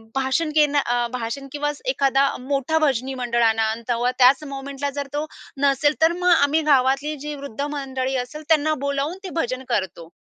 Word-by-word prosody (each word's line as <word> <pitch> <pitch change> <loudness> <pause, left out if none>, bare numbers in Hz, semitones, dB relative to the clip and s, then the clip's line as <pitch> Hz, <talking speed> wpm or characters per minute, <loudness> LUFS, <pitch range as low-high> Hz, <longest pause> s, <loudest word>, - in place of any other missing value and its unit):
भाषण 270 +4 0
घेणं 295 -2 +4
अ, 240 -2 0
भाषण 250 +3 -4
किंवा 295 +1 -1 0.2
एखादा 275 - +2
मोठा 275 +4 -1
भजनी 270 -3 0
मंडळ 235 -1 +1
आणा." 225 -1 +2
अन् 225 +1 -5
तेव्हा 240 +1 +1
त्याच 265 +4 +6
मोमेंटला 275 0 -5
जर 280 0 -5
तो 295 +1 -1 0.4
नसेल, 285 +1 +3
तर 325 +1 +5
मग 360 0 +3
आम्ही 285 +2 +3
गावातली 275 +3 +2
जी 295 0 -5
वृद्ध 280 -3 -7
मंडळी 270 -2 -3
असेल 300 +5 -10
त्यांना 310 -1 +3
बोलावून 280 +5 -1
ते 380 - -5
भजन 255 +2 -4
करतो. 185 -7 -2
275 Hz, 175 wpm, -22 LUFS, 255-295 Hz, 0.4 s, त्याच